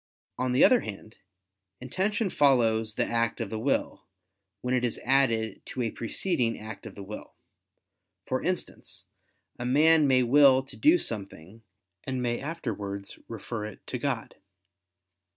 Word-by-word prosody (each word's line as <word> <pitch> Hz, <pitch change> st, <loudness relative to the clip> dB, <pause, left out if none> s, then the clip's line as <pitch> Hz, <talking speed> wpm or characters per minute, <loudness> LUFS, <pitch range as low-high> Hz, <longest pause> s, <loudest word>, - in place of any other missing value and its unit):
On 130 Hz, 0 st, 0 dB
the 125 Hz, -, +6 dB
other 255 Hz, -, +5 dB
hand, 110 Hz, -, -9 dB, 0.6 s
intention 190 Hz, -, -1 dB
follows 115 Hz, -6 st, +3 dB
the -, -, +1 dB
act 115 Hz, 0 st, 0 dB
of -, -, -4 dB
the 110 Hz, -, -3 dB
will, -, -, -1 dB, 0.5 s
when 125 Hz, 0 st, -1 dB
it 125 Hz, -1 st, +1 dB
is 120 Hz, -, -1 dB
added 115 Hz, -5 st, +2 dB
to 125 Hz, -, -3 dB
a 115 Hz, -, -1 dB
preceding 120 Hz, -, -1 dB
act 110 Hz, +1 st, -8 dB
of -, -, -11 dB
the 100 Hz, -, -8 dB
will; 105 Hz, +2 st, -9 dB, 0.9 s
for 130 Hz, 0 st, -1 dB
instance, 180 Hz, +1 st, -4 dB, 0.5 s
a 120 Hz, -, -4 dB
man 155 Hz, +3 st, +5 dB
may 130 Hz, -1 st, +4 dB
will 135 Hz, +1 st, +6 dB
to 135 Hz, -, -12 dB
do 315 Hz, +4 st, +5 dB
something, 100 Hz, -, -7 dB, 0.4 s
and 130 Hz, -1 st, -3 dB
may 120 Hz, -1 st, -1 dB
afterwards 105 Hz, -10 st, -5 dB
refer 115 Hz, 0 st, -5 dB
it 110 Hz, -, -12 dB
to 125 Hz, -, -4 dB
God. 125 Hz, -4 st, -3 dB
125 Hz, 150 wpm, -28 LUFS, 110-140 Hz, 0.9 s, the